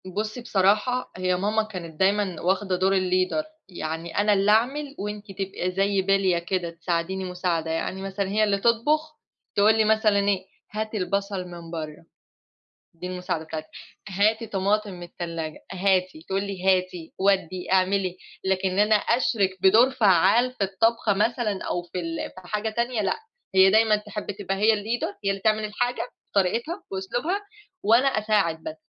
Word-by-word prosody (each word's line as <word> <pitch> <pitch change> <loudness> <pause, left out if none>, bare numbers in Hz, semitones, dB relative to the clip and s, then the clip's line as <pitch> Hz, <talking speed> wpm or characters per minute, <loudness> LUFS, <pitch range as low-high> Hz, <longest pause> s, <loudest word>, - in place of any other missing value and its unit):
بُصّي 215 +3 -3
بصراحة 215 +4 +1
هي 185 0 +1
ماما 210 +4 +1
كانت 175 -7 -8
دايمًا 195 -2 +1
واخدة 190 +1 +1
دور 185 +2 +2
الleader 185 +9 +1 0.2
يعني 165 -1 -5
أنا 205 0 +4
اللي 200 +1 +3
أعمل 275 +6 +1
وأنتِ 210 +1 -5
تبقى 190 -1 -3
زي 195 +1 +1
بليّة 190 -2 +2
كده، 175 0 -2
تساعديني 170 +2 -2
مساعدة 180 -3 -2
يعني 185 +4 -3
مثلًًا 195 0 -3
هي 215 +2 +2
اللي 205 -2 +2
تطبخ، 300 +9 +1 0.4
تقول 210 +2 +5
لي 220 - +4
مثلًا 215 -1 +3
إيه 200 -1 0 0.3
هاتي 215 +1 -3
البصل 200 -1 -2
من 170 -2 -10
برّه. 155 -1 -6 0.9
دي 175 +2 -7
المساعدة 180 -3 -3
بتاعتها 155 0 -7 0.4
هاتي 215 +4 +1
طماطم 205 +1 0
من 175 -1 -9
التلاجة، 170 -2 -6
هاتي، 185 -3 +1
تقول 195 +1 0
لي 190 -2 -6
هاتي 185 -3 +1
ودِّي 185 -2 0
اعملي 185 -1 +2 0.3
لكن 190 0 +1
إن 185 - -3
أنا 210 +1 +5
أشرِك 205 -4 +1
بدور 220 +7 +6
فعّال 215 +2 +4
في 205 -6 -1
الطبخة 210 +2 +1
مثلًا 215 -1 0
أو 175 - -1
في 175 +1 -6
ال 165 -1 -4
في 185 -1 -13
حاجة 210 +1 -1
تانية 235 0 -1
لأ، 195 - 0 0.4
هي 190 0 +7
دايمًا 220 +1 +5
تحب 210 0 -7
تبقى 195 -1 -2
هي 215 +3 +4
الleader 215 0 -3
هي 195 - +2
اللي 195 - -2
تعمل 215 0 +2
الحاجة 245 +4 -1 0.3
بطريقتها 235 - 0
وأسلوبها 240 - -2 0.4
وأنا 230 +5 +5
أساعد 210 -8 +1
بس 160 - -5
195 Hz, 160 wpm, -25 LUFS, 185-215 Hz, 0.9 s, هي